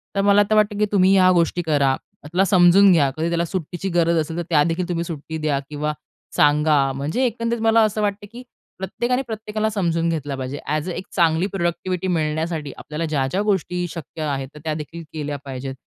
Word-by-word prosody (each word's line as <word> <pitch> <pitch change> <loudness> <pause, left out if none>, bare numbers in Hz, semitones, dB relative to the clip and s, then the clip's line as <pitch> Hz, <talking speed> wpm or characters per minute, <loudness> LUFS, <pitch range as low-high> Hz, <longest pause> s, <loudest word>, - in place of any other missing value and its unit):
तर 200 - +2
मला 200 +1 +5
आता 205 +1 +1
वाटतं 210 -1 +2
की 210 - +4
तुम्ही 190 -1 +4
ह्या 185 -1 +6
गोष्टी 175 0 +1
करा. 145 -5 +2 0.3
त्याला 175 +6 +1
समजून 190 +1 +6
घ्या. 150 -6 +4
कधी 160 +1 0
त्याला 170 0 0
सुट्टीची 180 +1 -4
गरज 170 -1 +2
असेल, 160 +1 -3
तर 175 - -1
त्यादेखील 165 +3 +2
तुम्ही 170 -1 -1
सुट्टी 160 -1 -6
द्या 155 -3 0
किंवा 150 0 -2 0.4
सांगा. 150 -2 +3
म्हणजे 150 - -1
एकंदरीत 230 0 -2
मला 225 0 +4
असं 215 0 0
वाटतं, 205 0 -2
की 245 +2 -10 0.4
प्रत्येकाने 240 +7 -1
प्रत्येकाला 220 -1 -2
समजून 170 -5 0
घेतलं 145 -4 -3
पाहिजे. 130 +2 -5
ॲज 155 +4 -2
अ - - -3
एक 190 - -6
चांगली 170 0 +3
प्रॉडक्टिव्हिटी 180 0 -2
मिळण्यासाठी 160 -2 -1
आपल्याला 155 +2 -5
ज्या-ज्या 150 +3 -1
गोष्टी 180 -3 -1
शक्य 160 -1 -8
आहेत. 135 -3 -2
तर - - -10
त्यादेखील 155 +1 -5
केल्या 145 -2 -4
पाहिजेत. 135 0 -6
170 Hz, 190 wpm, -21 LUFS, 150-195 Hz, 0.4 s, ह्या